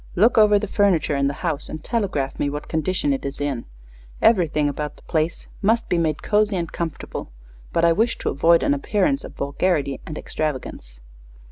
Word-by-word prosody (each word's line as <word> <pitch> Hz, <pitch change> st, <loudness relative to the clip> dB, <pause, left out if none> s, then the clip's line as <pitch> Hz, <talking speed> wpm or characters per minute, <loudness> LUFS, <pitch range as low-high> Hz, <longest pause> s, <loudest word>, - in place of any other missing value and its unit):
Look 220 Hz, +7 st, +4 dB
over 210 Hz, -2 st, +6 dB
the 205 Hz, -, -1 dB
furniture 195 Hz, -8 st, +2 dB
in 140 Hz, 0 st, +2 dB
the 140 Hz, -, -2 dB
house 155 Hz, -4 st, -2 dB
and 155 Hz, -, -7 dB
telegraph 190 Hz, -, -2 dB
me 145 Hz, -, +1 dB
what 145 Hz, +1 st, -5 dB
condition 185 Hz, -, 0 dB
it 270 Hz, -, -3 dB
is 140 Hz, -, -5 dB
in. 140 Hz, -5 st, -2 dB, 0.5 s
Everything 165 Hz, -9 st, +3 dB
about 150 Hz, +1 st, -3 dB
the -, -, -20 dB
place 160 Hz, +1 st, -1 dB
must 225 Hz, +3 st, +2 dB
be 175 Hz, -, +2 dB
made 155 Hz, -3 st, -1 dB
cozy 210 Hz, -1 st, +2 dB
and 170 Hz, -3 st, -2 dB
comfortable, 160 Hz, -, -5 dB, 0.4 s
but 170 Hz, -, +2 dB
I 170 Hz, -, +5 dB
wish 225 Hz, +7 st, +1 dB
to -, -, -2 dB
avoid 165 Hz, +4 st, +4 dB
an -, -, +3 dB
appearance 215 Hz, -, 0 dB
of -, -, -10 dB
vulgarity 140 Hz, -1 st, -1 dB
or 155 Hz, -, -5 dB
extravagance." 130 Hz, -, -5 dB
165 Hz, 190 wpm, -22 LUFS, 145-205 Hz, 0.5 s, over